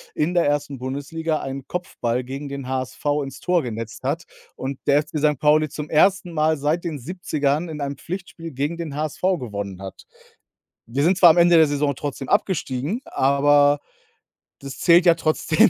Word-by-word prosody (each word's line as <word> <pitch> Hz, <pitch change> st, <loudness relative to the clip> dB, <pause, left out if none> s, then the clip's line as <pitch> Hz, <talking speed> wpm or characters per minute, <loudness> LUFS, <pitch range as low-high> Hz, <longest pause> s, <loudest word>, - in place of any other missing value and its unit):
in 155 Hz, +4 st, 0 dB
der 170 Hz, -5 st, +3 dB
1. 145 Hz, -2 st, -4 dB
Bundesliga 150 Hz, +5 st, -3 dB
einen 135 Hz, 0 st, -6 dB
Kopfball 125 Hz, -9 st, -2 dB
gegen 135 Hz, +3 st, -6 dB
den 140 Hz, -2 st, -6 dB
HSV 130 Hz, +2 st, -4 dB, 0.2 s
ins 135 Hz, -1 st, -8 dB
Tor 180 Hz, -1 st, +1 dB
genetzt 115 Hz, -2 st, -6 dB
hat -, -, -2 dB, 0.3 s
und 135 Hz, 0 st, -5 dB
der 145 Hz, +1 st, +4 dB
FC 155 Hz, 0 st, -5 dB
Sankt 150 Hz, -2 st, +1 dB
Pauli 155 Hz, +1 st, +4 dB
zum 150 Hz, +1 st, -6 dB
1. 180 Hz, +3 st, +3 dB
Mal 155 Hz, 0 st, +2 dB
seit 150 Hz, +4 st, 0 dB
den 160 Hz, -5 st, -4 dB
70ern 155 Hz, 0 st, -2 dB
in 155 Hz, -2 st, -6 dB
einem 140 Hz, 0 st, -3 dB
Pflichtspiel 170 Hz, -1 st, -7 dB
gegen 145 Hz, +6 st, -2 dB
den 160 Hz, -4 st, -5 dB
HSV 155 Hz, 0 st, -4 dB, 0.2 s
gewonnen 100 Hz, -5 st, -6 dB
hat. 95 Hz, -, -9 dB, 0.8 s
Wir 135 Hz, +5 st, -1 dB
sind 180 Hz, +3 st, +3 dB
zwar 175 Hz, -3 st, +8 dB
am 160 Hz, -, +4 dB
Ende 170 Hz, 0 st, +6 dB
der 160 Hz, -2 st, +6 dB
Saison 145 Hz, -1 st, 0 dB
trotzdem 140 Hz, -1 st, -5 dB
abgestiegen, 185 Hz, -, 0 dB
aber 145 Hz, +1 st, +3 dB, 0.8 s
das 140 Hz, -1 st, -8 dB
zählt 175 Hz, +1 st, +5 dB
ja 170 Hz, -, +7 dB
trotzdem. 160 Hz, +6 st, +3 dB
145 Hz, 175 wpm, -22 LUFS, 135-165 Hz, 0.8 s, zwar